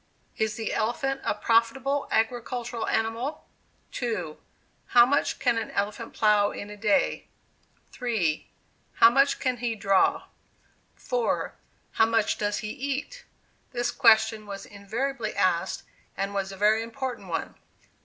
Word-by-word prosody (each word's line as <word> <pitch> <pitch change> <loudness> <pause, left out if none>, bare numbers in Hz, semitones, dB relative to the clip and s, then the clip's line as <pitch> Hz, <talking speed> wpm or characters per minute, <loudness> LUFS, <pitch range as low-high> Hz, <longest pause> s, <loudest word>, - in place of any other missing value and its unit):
"Is 220 -1 -1
the 220 -2 -3
elephant 270 +5 -1
a - - 0
profitable 260 +5 +1
agricultural 235 +1 -1
animal?" 225 +6 -2 0.5
2. 185 -11 -3 0.5
"How 240 -1 +7
much 285 +3 +1
can 230 - +1
an 225 - -5
elephant 210 +3 -3
plow 210 -1 +4
in 205 - -7
a - - -7
day?" 225 +7 +1 0.6
3. 215 - -1 0.5
"How 230 - +7
much 275 +2 +3
can 255 -1 0
he 235 -1 -2
draw?" 195 -2 +2 0.7
4. - - -1 0.4
"How 225 - +3
much 225 -2 +1
does 205 0 0
he - - -3
eat?" 285 - -4 0.5
this 240 0 0
question 220 -1 +4
was 200 -1 -7
invariably 220 +4 -4
asked, 185 0 +1 0.3
and 195 +1 -2
was 195 -1 -2
a 195 - -9
very 215 +2 +3
important 230 -2 -5
one. 165 - -3
225 Hz, 135 wpm, -27 LUFS, 205-250 Hz, 0.7 s, How